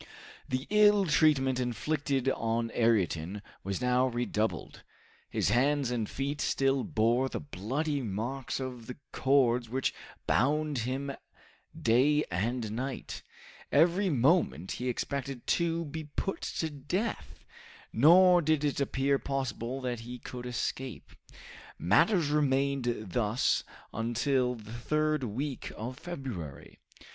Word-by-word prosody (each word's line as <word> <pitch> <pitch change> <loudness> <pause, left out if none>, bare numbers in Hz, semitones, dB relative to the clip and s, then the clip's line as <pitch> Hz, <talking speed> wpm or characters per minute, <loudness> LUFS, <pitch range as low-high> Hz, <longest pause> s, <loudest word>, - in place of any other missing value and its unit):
The 130 +2 -1
ill 210 -1 +5
treatment 140 -5 +3
inflicted 135 +2 -1
on 115 -2 -1
Ayrton 100 - +1 0.2
was 100 +4 -3
now 125 +1 +3
redoubled. 110 - -2 0.5
His - - 0
hands 135 +2 +2
and 115 -3 -1
feet 140 +1 -3
still 135 -1 +1
bore 120 +4 +1
the - - -4
bloody 145 - -2
marks 120 +6 -3
of 125 -3 -6
the 125 - -7
cords 125 -3 +2
which 130 +2 0 0.3
bound 150 +2 +1
him 140 +2 -2 0.7
day 140 +6 +3
and 110 +5 -1
night. 130 +4 -4 0.5
Every 175 +6 +4
moment 135 - +2
he 125 +1 -2
expected 135 0 -3
to 170 -1 +1
be 155 +1 -6
put 170 +6 -3
to 160 -1 -3
death, 145 - -4 0.5
nor 175 +8 +7
did 155 -2 +1
it 145 -1 0
appear 140 0 +1
possible 130 -1 -3
that 125 -2 -3
he 120 +2 -7
could 125 +1 -7
escape. 125 +1 -4 0.7
Matters 160 - +3
remained 135 -7 0
thus 110 +2 +1 0.3
until 125 +3 0
the 110 -1 -11
third 155 +4 0
week 130 +5 -4
of 125 +5 -6
February. 120 - -7
130 Hz, 120 wpm, -30 LUFS, 115-145 Hz, 0.7 s, nor